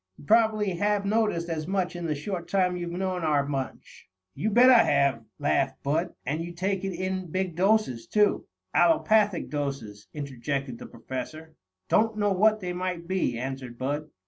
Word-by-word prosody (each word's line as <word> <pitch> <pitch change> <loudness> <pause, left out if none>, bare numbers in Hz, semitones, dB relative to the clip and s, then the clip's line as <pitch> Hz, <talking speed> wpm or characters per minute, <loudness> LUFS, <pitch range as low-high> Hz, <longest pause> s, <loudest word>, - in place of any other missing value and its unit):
"You - - -14
probably 215 0 +3
have 205 +1 +1
noticed 210 -5 +1
as 160 -2 -3
much 185 -2 -1
in 175 -1 -4
the 155 - -1
short 170 +3 -5
time 180 0 +1
you've 175 -1 -4
known 185 +1 -2
our 150 -3 +2
bunch." 135 -2 -6 0.2
"You 195 +10 -1
bet 245 +4 +7
I 245 - +8
have," 140 - +2
laughed 140 -2 0
Bud. 160 +5 -1
"And 155 +4 -2
you 175 +1 -7
take 190 +2 -2
it 195 -1 -2
in 185 0 -3
big 185 0 -2
doses, 185 - +1
too." 210 -1 +2 0.3
"Allopathic 215 - +3
doses," 135 -9 -4
interjected 135 -2 -4
the - - -9
Professor. 155 +7 -7 0.3
"Don't 220 0 +2
know 205 -1 +1
what 215 +3 +3
they 180 -1 -3
might 180 -1 -4
be," 185 -10 0
answered 130 -1 -5
Bud. 145 +4 -3
175 Hz, 170 wpm, -27 LUFS, 140-200 Hz, 0.3 s, I